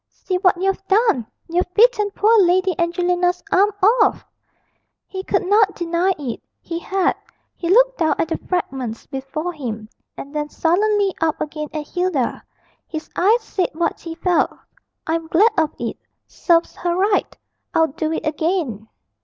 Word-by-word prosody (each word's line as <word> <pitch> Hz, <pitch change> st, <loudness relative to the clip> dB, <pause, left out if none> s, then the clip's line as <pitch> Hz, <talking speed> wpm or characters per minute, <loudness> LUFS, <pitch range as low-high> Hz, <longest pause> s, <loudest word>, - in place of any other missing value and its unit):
'See 370 Hz, -, -3 dB
what 365 Hz, -2 st, +3 dB
you've 390 Hz, +1 st, 0 dB
done! 400 Hz, -, +2 dB, 0.2 s
you've 355 Hz, +1 st, -1 dB
bitten 435 Hz, -2 st, +4 dB
poor 430 Hz, +3 st, +3 dB
Lady 370 Hz, 0 st, +3 dB
Angelina's 355 Hz, +1 st, +1 dB
arm 400 Hz, +3 st, +4 dB, 0.3 s
off.' -, -, +2 dB, 0.8 s
He 380 Hz, -1 st, -6 dB
could 385 Hz, -, 0 dB
not 405 Hz, +1 st, +3 dB
deny 345 Hz, +2 st, 0 dB
it; 265 Hz, -6 st, -5 dB, 0.2 s
he 335 Hz, -1 st, -5 dB
had. 380 Hz, +1 st, +1 dB, 0.4 s
He 340 Hz, -, -4 dB
looked -, -, +4 dB
down 315 Hz, -2 st, +2 dB
at 325 Hz, -, -1 dB
the -, -, -2 dB
fragments 265 Hz, -10 st, -3 dB
before 295 Hz, +6 st, -5 dB
him, 225 Hz, -8 st, -6 dB, 0.3 s
and 280 Hz, -, -8 dB
then 300 Hz, 0 st, -2 dB
sullenly 400 Hz, +4 st, +1 dB
up 320 Hz, -1 st, +1 dB
again 305 Hz, 0 st, -4 dB
at 305 Hz, -1 st, -4 dB
Hilda. 355 Hz, -9 st, -1 dB, 0.5 s
His 315 Hz, -1 st, -7 dB
eyes 435 Hz, +6 st, +3 dB
said 380 Hz, -4 st, -1 dB
what 335 Hz, +2 st, -1 dB
he 330 Hz, -1 st, -7 dB
felt 355 Hz, +1 st, +2 dB, 0.6 s
'I'm 325 Hz, 0 st, -2 dB
glad 410 Hz, +8 st, +4 dB
of 315 Hz, -2 st, +2 dB
it -, -, -4 dB, 0.3 s
serves 340 Hz, -1 st, +1 dB
her 345 Hz, -1 st, -1 dB
right; 395 Hz, +2 st, +1 dB, 0.4 s
I'd 320 Hz, -4 st, +2 dB
do 315 Hz, -1 st, -1 dB
it 320 Hz, -, -3 dB
again.' 310 Hz, -, -1 dB
350 Hz, 155 wpm, -20 LUFS, 315-385 Hz, 0.8 s, bitten